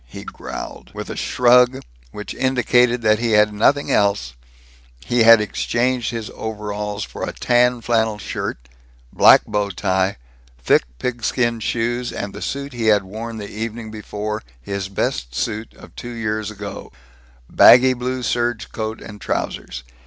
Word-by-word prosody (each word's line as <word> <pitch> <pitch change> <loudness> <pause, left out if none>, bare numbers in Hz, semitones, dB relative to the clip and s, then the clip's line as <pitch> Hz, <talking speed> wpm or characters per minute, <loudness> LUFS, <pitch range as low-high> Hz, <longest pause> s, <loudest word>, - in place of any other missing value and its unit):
he 60 - -10
growled. - - -8
With - - -6
a - - -5
shrug 125 +1 +3 0.3
which 105 +7 -7
indicated 125 -2 +2
that 110 0 +3
he 115 -1 0
had 105 0 +4
nothing 140 +7 +2
else, 100 -11 +1 0.7
he 120 -1 +1
had 115 0 +8
exchanged 120 +3 -1
his 115 -2 -5
overalls 105 -1 -4
for - - -9
a - - -2
tan 125 0 +2
flannel 110 -2 +1
shirt, 65 -9 -5 0.5
black - - +7
bow 105 -1 -1
tie, 95 +1 0 0.4
thick - - +2
pigskin 120 - -1
shoes, 120 +2 -2
and 100 -1 -5
the 105 - -9
suit 140 0 -4
he 115 -2 -2
had 105 -2 +4
worn 110 +4 -7
the 105 -1 -6
evening 110 +1 -6
before, 105 0 -5 0.2
his 95 +8 -5
best - - -2
suit 110 - -3
of - - -15
two 120 - -7
years 110 -2 -2
ago 110 - -8 0.6
baggy 130 - +7
blue 125 +1 -3
serge 120 -1 -1
coat 110 0 -4
and 105 -1 -11
trousers. 65 - -4
110 Hz, 150 wpm, -20 LUFS, 105-120 Hz, 0.7 s, had